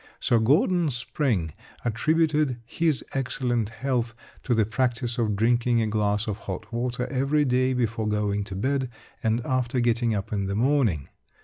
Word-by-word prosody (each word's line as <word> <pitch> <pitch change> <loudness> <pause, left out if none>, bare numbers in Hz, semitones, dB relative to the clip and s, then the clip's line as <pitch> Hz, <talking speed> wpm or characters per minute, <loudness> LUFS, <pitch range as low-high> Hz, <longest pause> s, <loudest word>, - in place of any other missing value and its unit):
Sir 120 - +2
Gordon 160 +8 +3
Spring 120 - -1 0.3
attributed 150 +2 +1
his 150 +1 0
excellent 125 -4 -1
health 120 -1 -2 0.3
to 120 - 0
the 110 -2 +3
practice 120 +1 -1
of 110 -3 +1
drinking 120 +2 +2
a 115 - +2
glass 105 -1 0
of 105 -1 -3
hot 95 +4 -5
water 125 +1 -1
every 140 +3 +2
day 130 0 +2
before 115 -3 -1
going 105 -1 0
to 95 - -7
bed 130 +5 0 0.3
and 115 +1 0
after 130 0 0
getting 120 -1 +2
up 100 +1 -4
in 100 -2 -1
the 100 - -2
morning. 115 - +1
120 Hz, 155 wpm, -26 LUFS, 110-130 Hz, 0.3 s, Gordon